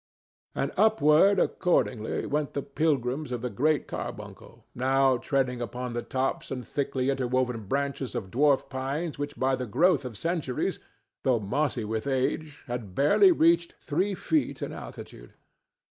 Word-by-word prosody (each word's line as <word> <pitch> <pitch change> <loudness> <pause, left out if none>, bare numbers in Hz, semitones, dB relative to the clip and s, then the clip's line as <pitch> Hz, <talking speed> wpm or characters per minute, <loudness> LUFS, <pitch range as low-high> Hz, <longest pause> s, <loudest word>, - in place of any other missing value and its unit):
And - - -1
upward, 200 -3 +5
accordingly, 120 - 0
went 150 -1 -1
the 140 - -2
pilgrims 145 -2 -1
of 120 -1 -3
the 125 - -2
Great 155 +3 +1
Carbuncle, - - -8
now 130 +1 +3
treading 125 -1 -1
upon 125 +1 -4
the 120 - -2
tops 130 +2 -2
and 125 -3 -5
thickly 135 -1 -1
interwoven 125 -3 -1
branches 140 -1 -2
of 95 -2 -4
dwarf 140 +2 +3
pines 140 +4 -3
which 145 0 -4
by 130 0 +2
the 125 -1 -5
growth 160 - +3
of 120 -5 -6
centuries, 165 - -2 0.4
though 125 -3 +3
mossy 125 +2 -1
with 110 +4 -3
age, 140 +3 -1
had 115 -7 -6
barely 150 - +5
reached 170 - +3
three 185 +7 -1
feet 310 - -1
in - - -4
altitude. - - -10
135 Hz, 145 wpm, -27 LUFS, 125-150 Hz, 0.4 s, upward